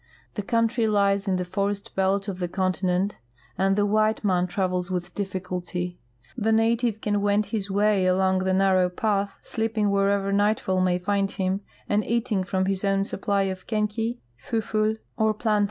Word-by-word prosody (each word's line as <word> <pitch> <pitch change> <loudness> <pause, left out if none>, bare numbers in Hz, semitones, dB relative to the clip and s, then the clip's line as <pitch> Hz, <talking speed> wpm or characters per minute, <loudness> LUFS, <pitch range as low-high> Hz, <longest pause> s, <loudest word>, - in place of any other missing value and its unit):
The 210 - -3
country 230 +2 +1
lies 200 -1 +2
in 190 - +2
the 180 0 -1
forest 200 +2 -2
belt 195 +1 +1
of 190 -2 -4
the 175 - -1
continent, 185 +1 0 0.4
and 195 +1 +2
the 205 0 +2
white 215 +1 +2
man 180 -3 +2
travels 180 -1 -1
with 180 -1 -3
difficult3^ 180 -2 -4 0.4
The 220 +1 0
native 225 0 +2
can 205 -1 0
wend 205 +1 +2
his 205 -1 -3
way 200 -1 +2
along 190 0 +2
the 190 0 0
narrow 190 -1 +3
path, 200 +1 -1
sleeping 220 -2 -1
wherever 200 0 +1
nightfall 200 -2 +2
may 180 -1 +2
find 195 +2 0
him, 190 0 -1 0.3
and 210 +1 +1
eating 230 -4 0
from 190 0 0
his 195 0 -1
own 195 -1 +2
supply 200 0 0
of 190 -1 -4
kenke, 220 +2 -1 0.3
fuful, 215 -1 0 0.2
or 220 -1 +2
plantain. 215 -1 +1
200 Hz, 170 wpm, -25 LUFS, 185-215 Hz, 0.4 s, narrow